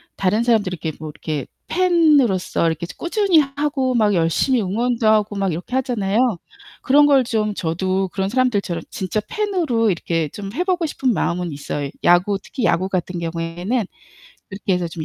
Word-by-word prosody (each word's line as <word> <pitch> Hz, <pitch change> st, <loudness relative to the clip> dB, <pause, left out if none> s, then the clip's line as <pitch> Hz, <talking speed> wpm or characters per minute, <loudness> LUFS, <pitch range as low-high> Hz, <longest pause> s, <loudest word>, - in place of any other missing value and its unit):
다른 210 Hz, +4 st, +1 dB
사람들 220 Hz, -6 st, +2 dB
이렇게 160 Hz, -1 st, -4 dB
뭐 155 Hz, -1 st, -6 dB
이렇게 150 Hz, -2 st, -4 dB, 0.2 s
팬으로서 300 Hz, -, +3 dB
이렇게 160 Hz, +1 st, -2 dB
좀 -, -, -11 dB
꾸준히 360 Hz, -1 st, +2 dB
하 275 Hz, -2 st, 0 dB
하고 280 Hz, -3 st, 0 dB
막 210 Hz, -3 st, +3 dB
열심히 175 Hz, -, +2 dB
응원도 230 Hz, +4 st, 0 dB
하고 215 Hz, -1 st, +3 dB
막 195 Hz, -2 st, 0 dB
이렇게 180 Hz, +10 st, -5 dB
하잖아요. 230 Hz, -5 st, 0 dB, 0.6 s
그런 290 Hz, +2 st, +5 dB
걸 275 Hz, -3 st, +5 dB
좀 215 Hz, -3 st, -1 dB
저도 185 Hz, +2 st, -1 dB
그런 195 Hz, +1 st, -2 dB
사람들처럼 220 Hz, -8 st, 0 dB
진짜 210 Hz, -1 st, -2 dB
팬으로 335 Hz, -, 0 dB
이렇게 165 Hz, -3 st, -1 dB
좀 200 Hz, +3 st, -7 dB
해 350 Hz, +6 st, 0 dB
보고 365 Hz, -3 st, 0 dB
싶은 265 Hz, -5 st, 0 dB
마음은 175 Hz, -3 st, -1 dB
있어요. 145 Hz, 0 st, -4 dB
야구, 180 Hz, +3 st, +4 dB
특히 255 Hz, -, -5 dB
야구 180 Hz, +2 st, +1 dB
같은 180 Hz, -1 st, -2 dB
경우에는 170 Hz, +7 st, -2 dB, 0.6 s
그렇게 195 Hz, -1 st, -3 dB
해서 180 Hz, -1 st, -1 dB
좀 160 Hz, -1 st, -6 dB
205 Hz, 375 characters per minute, -20 LUFS, 175-255 Hz, 0.6 s, 그런